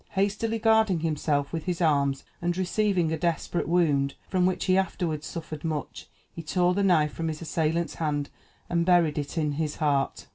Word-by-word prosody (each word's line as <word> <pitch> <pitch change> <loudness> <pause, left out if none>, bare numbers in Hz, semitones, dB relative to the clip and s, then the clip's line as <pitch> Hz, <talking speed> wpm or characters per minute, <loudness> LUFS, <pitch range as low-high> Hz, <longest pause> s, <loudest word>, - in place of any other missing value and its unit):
Hastily 205 +3 0
guarding 220 -6 +3
himself 150 -2 -1
with 165 -2 -3
his 180 -2 -2
arms, 140 -5 +2 0.2
and 175 +1 -1
receiving 185 -2 +1
a 160 - -2
desperate 170 0 -1
wound, 145 -6 +2
from 185 -1 +2
which 180 -1 -1
he 185 - +3
afterward 175 -5 -1
suffered 155 -3 -7
much, 155 -3 -4 0.3
he 165 - -6
tore 180 +2 +1
the 200 - 0
knife 160 -6 +3
from 165 - -3
his 155 -1 -3
assailant's 165 0 -1
hand, 145 -3 -2 0.4
and 170 -1 +1
buried 170 -4 +3
it 145 +3 -5
in 150 -2 +1
his 150 +1 -2
heart. 140 -3 0
165 Hz, 180 wpm, -27 LUFS, 150-180 Hz, 0.4 s, guarding